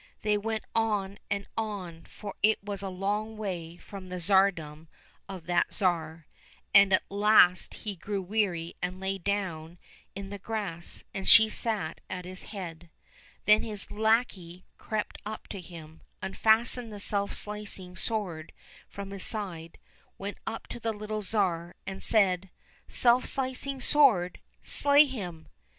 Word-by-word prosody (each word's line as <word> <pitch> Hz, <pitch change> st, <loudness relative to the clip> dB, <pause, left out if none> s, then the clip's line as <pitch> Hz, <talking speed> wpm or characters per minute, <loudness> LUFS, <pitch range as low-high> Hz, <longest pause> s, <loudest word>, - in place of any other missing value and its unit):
They 210 Hz, -1 st, +2 dB
went 220 Hz, +1 st, -2 dB
on 205 Hz, -3 st, 0 dB
and 200 Hz, -1 st, -2 dB
on, 195 Hz, -7 st, -4 dB
for 205 Hz, -2 st, -8 dB
it 215 Hz, 0 st, +3 dB
was 200 Hz, -1 st, -4 dB
a 195 Hz, -, -3 dB
long 205 Hz, +4 st, -2 dB
way 175 Hz, -5 st, -5 dB
from 190 Hz, -1 st, -10 dB
the 180 Hz, -, -5 dB
tsardom 170 Hz, -5 st, +2 dB, 0.4 s
of 185 Hz, -4 st, -7 dB
that 175 Hz, 0 st, +1 dB
Tsar, 165 Hz, -4 st, 0 dB, 0.5 s
and 200 Hz, -1 st, +8 dB
at 190 Hz, -, +4 dB
last 200 Hz, -3 st, +4 dB
he 205 Hz, -2 st, -2 dB
grew 200 Hz, +3 st, -3 dB
weary 185 Hz, -4 st, -1 dB
and 180 Hz, +1 st, -3 dB
lay 190 Hz, 0 st, -2 dB
down 175 Hz, -4 st, -3 dB, 0.4 s
in 195 Hz, 0 st, -7 dB
the 200 Hz, -, -6 dB
grass, 195 Hz, -5 st, -4 dB
and 195 Hz, -, -2 dB
she 220 Hz, -1 st, +9 dB
sat 210 Hz, -9 st, -2 dB
at 180 Hz, -1 st, -5 dB
his 185 Hz, 0 st, -7 dB
head. 175 Hz, -5 st, -8 dB, 0.6 s
Then 210 Hz, +1 st, +6 dB
his 210 Hz, -3 st, -3 dB
lackey 210 Hz, -5 st, 0 dB
crept 215 Hz, -1 st, -3 dB
up 215 Hz, +1 st, -7 dB
to 195 Hz, -, -6 dB
him, 160 Hz, -2 st, -12 dB, 0.2 s
unfastened 225 Hz, +4 st, +2 dB
the 205 Hz, -, -7 dB
self 200 Hz, 0 st, +1 dB
slicing 205 Hz, -3 st, -2 dB
sword 185 Hz, -8 st, -4 dB, 0.4 s
from 200 Hz, 0 st, -7 dB
his 195 Hz, -1 st, -5 dB
side, 175 Hz, -7 st, -3 dB, 0.4 s
went 200 Hz, +1 st, -6 dB
up 225 Hz, 0 st, -4 dB
to -, -, -6 dB
the 225 Hz, -1 st, -1 dB
little 215 Hz, 0 st, -4 dB
Tsar, 180 Hz, -5 st, 0 dB
and 195 Hz, 0 st, -6 dB
said, 190 Hz, -4 st, +3 dB, 0.2 s
" -, -, -31 dB
Self 245 Hz, +1 st, +4 dB
slicing 265 Hz, +1 st, -2 dB
sword! 245 Hz, -11 st, +4 dB, 0.2 s
slay 285 Hz, +1 st, +6 dB
him! 180 Hz, -, -6 dB
200 Hz, 150 wpm, -29 LUFS, 180-215 Hz, 0.6 s, she